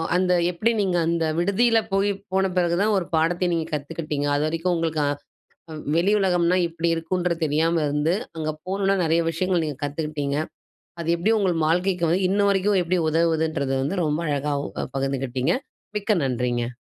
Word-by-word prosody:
அந்த 180 0 +2 0.2
எப்பிடி 215 +7 +1
நீங்க 185 -3 +1
அந்த 170 -1 +1
விடுதியில 225 +6 +3
போய் 195 +1 +2 0.2
போன 190 0 +2
பிறகு 175 -1 +2
தான் 215 0 +2
ஒரு 180 - -1
பாடத்த 175 +3 +1
நீங்க 165 -1 0
கத்துக்கிட்டீங்க. 150 0 -3
அது 145 - +1
வரைக்கும் 165 +3 -1
உங்களுக்கு 165 -2 -1 0.7
அ - - -6 0.2
வெளி 190 +4 +3
உலகம்னா 180 -1 +2
இப்பிடி 165 0 -2
இருக்குன்ற 175 +1 -1
தெரியாம 160 +3 +1
இருந்து, 150 +3 +1 0.2
அங்க 155 -1 -2 0.2
போனவுன 195 +1 +1
நிறைய 165 +1 +2
விஷயங்கள் 180 0 0
நீங்க 150 -4 -4
கத்துக்கிட்டீங்க. 145 -1 -2 0.6
அது 165 - -4
எப்பிடி 210 +7 +1
உங்க 195 -3 +2 0.2
வாழ்க்கைக்கு 180 +1 +1
வந்து, 180 +4 +2
இன்னவரைக்கும் 200 0 +2
எப்பிடி 175 +1 0
உதவுதுன்றது 160 -4 +1
வந்து 180 +6 -1
ரொம்ப 150 +2 0
அழகாவும் 145 0 -2
அ - - -3
பகிர்ந்துக்கிட்டீங்க. 135 +2 -1 0.4
மிக்க 210 0 +1
நன்றிங்க. 120 -1 -1
170 Hz, 155 wpm, -24 LUFS, 150-185 Hz, 0.7 s, விடுதியில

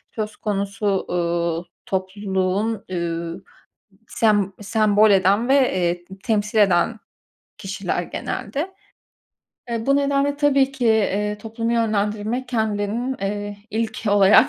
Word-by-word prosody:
söz 215 -1 -3
konusu, 200 0 -3 0.2
uuu, 170 -1 -1 0.2
topluluğun, 190 +2 -1
üüü, 170 -2 -3 0.7
sem 205 -3 +2
sembol 215 0 +4
eden 200 +5 +3
ve, 270 - +5 0.2
eee, 175 -1 0 0.2
temsil 215 0 0
eden 200 +2 +3 0.6
kişiler - - -3
genelde. 315 +7 -4 1.0
Eee, 230 0 -2
bu 275 0 +4
nedenle 280 0 +1
tabii 275 -2 +3
ki, 250 -3 -1
iii, 210 -1 +2
toplumu 230 +2 -3
yönlendirmek 215 +2 0
kendilerinin, 220 +2 -1
eee, 205 +1 -3
ilk 225 +1 -2
olarak 205 +6 +6
210 Hz, 110 wpm, -22 LUFS, 195-230 Hz, 1.0 s, olarak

